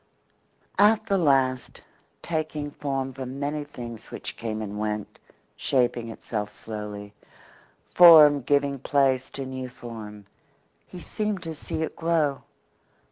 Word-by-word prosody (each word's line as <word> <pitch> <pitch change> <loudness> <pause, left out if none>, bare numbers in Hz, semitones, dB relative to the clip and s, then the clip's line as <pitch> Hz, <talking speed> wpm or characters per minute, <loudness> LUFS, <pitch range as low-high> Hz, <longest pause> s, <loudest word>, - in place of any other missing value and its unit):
At 215 +1 +5
the 200 -3 +1
last, 135 -5 +1 0.4
taking 155 -2 -3
form 135 -2 -3
from 130 +1 -6
many 145 +1 -2
things 120 -6 -9
which - - -6
came 110 -2 -4
and 105 0 -6
went, 105 -1 -4 0.4
shaping 120 -3 0
itself 105 -2 -4
slowly, 105 -1 -8 0.8
form 155 -5 +9
giving 140 +1 +1
place 135 -1 +1
to 135 - -6
new 130 -1 -5
form, 110 -4 -9 0.6
he 180 - -10
seemed 210 0 -3
to 165 -1 -5
see 155 +1 -4
it - - -5
grow. 160 -4 0
135 Hz, 125 wpm, -26 LUFS, 115-150 Hz, 0.8 s, form